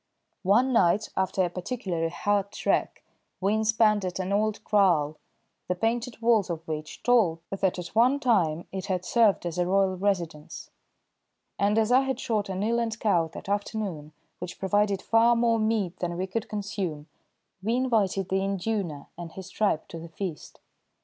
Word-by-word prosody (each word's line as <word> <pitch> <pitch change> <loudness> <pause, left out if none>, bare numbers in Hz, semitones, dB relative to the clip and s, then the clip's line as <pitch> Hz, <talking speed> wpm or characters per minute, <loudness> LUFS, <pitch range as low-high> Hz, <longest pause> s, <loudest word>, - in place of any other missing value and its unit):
One 225 +8 +3
night 210 0 +3
after 190 0 +1
a - - -2
particularly 180 -4 -3
hard 200 +3 0
trek - - -1 0.4
we 195 +2 +1
inspanned 220 -1 +3
at 180 -1 -3
an 190 +1 -2
old 215 +1 0
kraal, 170 -8 +2 0.5
the 180 - 0
painted 230 +4 -1
walls 225 -5 +3
of 165 -1 -5
which 155 -1 -6
told 225 -9 +3
that 195 -1 0
at 175 -1 -5
one 250 +6 +4
time 175 - +1
it 190 0 -5
had 185 -2 -2
served 220 -5 +3
as 175 0 -3
a 175 - +1
royal 190 0 +2
residence, 175 -6 -3 0.9
and 205 +2 +2
as 225 +1 +2
I 255 +2 +6
had 265 -1 -2
shot 210 -3 -1
an 190 +1 -2
eland 230 0 0
cow 175 -6 +2
that - - -8
afternoon, 200 -7 -3 0.3
which 180 0 -7
provided 200 0 +1
far 230 +1 +4
more 230 -1 +2
meat 215 -5 0
than 175 -1 -3
we 185 - -1
could 210 +4 -4
consume, 195 -7 -4 0.6
we 225 +5 0
invited 215 -7 +1
the 190 0 +1
induna 195 -6 -2
and 170 -1 -7
his 190 -2 -9
tribe 200 -7 0
to 165 - -7
the 165 +1 -9
feast. 170 -1 -7
195 Hz, 170 wpm, -27 LUFS, 175-220 Hz, 0.9 s, I